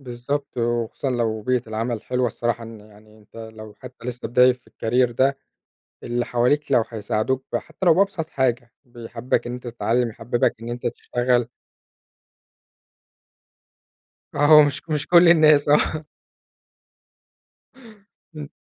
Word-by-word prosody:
بالضبط، 135 Hz, +2 st, -5 dB
وخصوصًا 120 Hz, +2 st, -2 dB
لو 115 Hz, -3 st, -1 dB
بيئة 125 Hz, +1 st, 0 dB
العمل 115 Hz, +1 st, -3 dB
حلوة 125 Hz, +1 st, -1 dB
الصراحة 120 Hz, 0 st, -2 dB
إن 115 Hz, -1 st, -11 dB
يعني 105 Hz, +1 st, -19 dB
أنت 105 Hz, +1 st, -21 dB
لو 110 Hz, -1 st, -10 dB
حتى 125 Hz, -1 st, -12 dB
لسه 125 Hz, 0 st, -5 dB
بداية 125 Hz, +1 st, +5 dB
في 125 Hz, 0 st, -18 dB
الcareer 125 Hz, +2 st, 0 dB
ده، 135 Hz, +3 st, +1 dB, 0.6 s
اللي 120 Hz, 0 st, -2 dB
حواليك 125 Hz, +5 st, 0 dB
لو 115 Hz, -, +4 dB
هيساعدوك 110 Hz, +4 st, -2 dB
ب -, -, +1 dB
حتى 190 Hz, -, -6 dB
لو 170 Hz, -, +6 dB
بأبسط 175 Hz, -3 st, 0 dB
حاجة، 120 Hz, -2 st, -1 dB
بيحببك 120 Hz, 0 st, -4 dB
إن 120 Hz, -, -4 dB
أنت 125 Hz, 0 st, -8 dB
تتعلم، 120 Hz, +1 st, -1 dB
يحببك 115 Hz, +2 st, -1 dB
إن 115 Hz, -, -7 dB
أنت 120 Hz, +1 st, -5 dB
تشتغل. 120 Hz, -1 st, -1 dB, 2.9 s
آه 145 Hz, +1 st, +3 dB
ومش 145 Hz, -2 st, +5 dB
مش 150 Hz, -2 st, -2 dB
كل 175 Hz, 0 st, +6 dB
الناس 155 Hz, -3 st, +5 dB
آه. 155 Hz, +1 st, +2 dB, 2.3 s
إمم. 150 Hz, -2 st, -7 dB
120 Hz, 130 wpm, -22 LUFS, 115-135 Hz, 2.9 s, لو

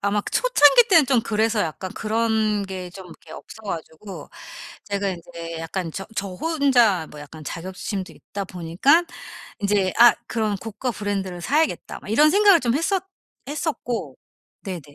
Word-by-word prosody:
아마 200 Hz, +1 st, +1 dB
그 -, -, -7 dB
초창기 485 Hz, -, +5 dB
때는 330 Hz, -7 st, +6 dB
좀 255 Hz, -4 st, +3 dB
그래서 220 Hz, 0 st, 0 dB
약간 180 Hz, +3 st, -3 dB
그런 220 Hz, -1 st, 0 dB
게 185 Hz, -2 st, -6 dB
좀 185 Hz, 0 st, -11 dB
이렇게 170 Hz, -, -14 dB
없어 220 Hz, -, -11 dB
가지고 170 Hz, -1 st, -7 dB, 0.5 s
제가 200 Hz, -1 st, -2 dB
인제 170 Hz, -2 st, -7 dB
약간 165 Hz, +1 st, -4 dB
저 195 Hz, -, -6 dB
저 195 Hz, -, -2 dB
혼자 245 Hz, -, +2 dB
뭐 150 Hz, -, -12 dB
약간 155 Hz, +2 st, -11 dB
자격지심도 185 Hz, +4 st, -5 dB
있다 200 Hz, -, -7 dB
보니깐 185 Hz, -, +2 dB, 0.5 s
인제 200 Hz, -2 st, +1 dB
'아. 240 Hz, 0 st, +9 dB
그런 215 Hz, -3 st, -1 dB
고가 225 Hz, +5 st, -4 dB
브랜드를 195 Hz, -4 st, -4 dB
사야겠다.' 305 Hz, -, 0 dB
막 -, -, -11 dB
이런 295 Hz, +8 st, +5 dB
생각을 400 Hz, -4 st, +6 dB
좀 240 Hz, -2 st, 0 dB
했었 360 Hz, +5 st, 0 dB, 0.4 s
했었고 290 Hz, -5 st, -3 dB, 0.5 s
네네. 185 Hz, -5 st, -5 dB
205 Hz, 315 characters per minute, -23 LUFS, 185-250 Hz, 0.5 s, 아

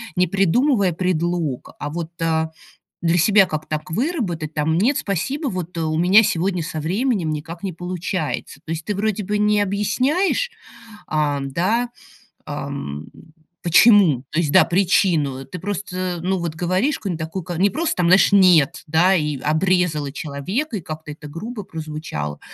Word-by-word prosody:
не 180 Hz, 0 st, +3 dB
придумывая 195 Hz, -, +2 dB
предлог, 170 Hz, -5 st, -1 dB
а 150 Hz, -, -4 dB
вот, 165 Hz, 0 st, -5 dB
а, 160 Hz, -1 st, +1 dB, 0.5 s
для 170 Hz, 0 st, +2 dB
себя 200 Hz, +3 st, +5 dB
как 155 Hz, -3 st, -4 dB
так 155 Hz, 0 st, -4 dB
выработать 180 Hz, -, -2 dB
там: 155 Hz, +1 st, +1 dB
"Нет, 250 Hz, +9 st, +2 dB
спасибо, 265 Hz, -, -2 dB
вот 180 Hz, -5 st, -5 dB
у 155 Hz, -1 st, -1 dB
меня 185 Hz, +6 st, +6 dB
сегодня 180 Hz, -2 st, 0 dB
со 160 Hz, -1 st, -4 dB
временем 190 Hz, -, 0 dB
никак 165 Hz, +3 st, -6 dB
не 195 Hz, -, -3 dB
получается". 175 Hz, -4 st, -4 dB
То 160 Hz, -, -3 dB
есть 160 Hz, 0 st, -4 dB
ты 210 Hz, -, -1 dB
вроде 210 Hz, +1 st, -1 dB
бы 210 Hz, +2 st, -1 dB
не 210 Hz, 0 st, +3 dB
объясняешь, 265 Hz, -, 0 dB, 0.6 s
а, 150 Hz, -2 st, 0 dB
да, 185 Hz, -, 0 dB, 0.6 s
ам, 140 Hz, -, -5 dB, 0.6 s
почему, 175 Hz, -, +5 dB
то 155 Hz, -, -3 dB
есть, 155 Hz, -4 st, 0 dB
да, -, -, +7 dB
причину, 170 Hz, -7 st, +1 dB
ты 180 Hz, -, -8 dB
просто, 185 Hz, -1 st, -3 dB
ну, 190 Hz, +1 st, 0 dB
вот 170 Hz, -2 st, -3 dB
говоришь 185 Hz, -, 0 dB
какую-нибудь 180 Hz, -5 st, -4 dB
такука, 175 Hz, +1 st, -5 dB
не 195 Hz, +3 st, +3 dB
просто 320 Hz, +4 st, -1 dB
там, 180 Hz, -, +2 dB
знаешь, 185 Hz, +3 st, +5 dB
нет, 180 Hz, -4 st, +5 dB
да, 175 Hz, +5 st, +4 dB
и 150 Hz, -4 st, -1 dB
обрезала 155 Hz, -1 st, +1 dB
человека, 180 Hz, -, -3 dB
и 185 Hz, -, -6 dB
как-то 155 Hz, 0 st, -8 dB
это 150 Hz, 0 st, -10 dB
грубо 210 Hz, +9 st, -6 dB
прозвучало. 155 Hz, -, -6 dB
175 Hz, 155 wpm, -21 LUFS, 155-200 Hz, 0.6 s, да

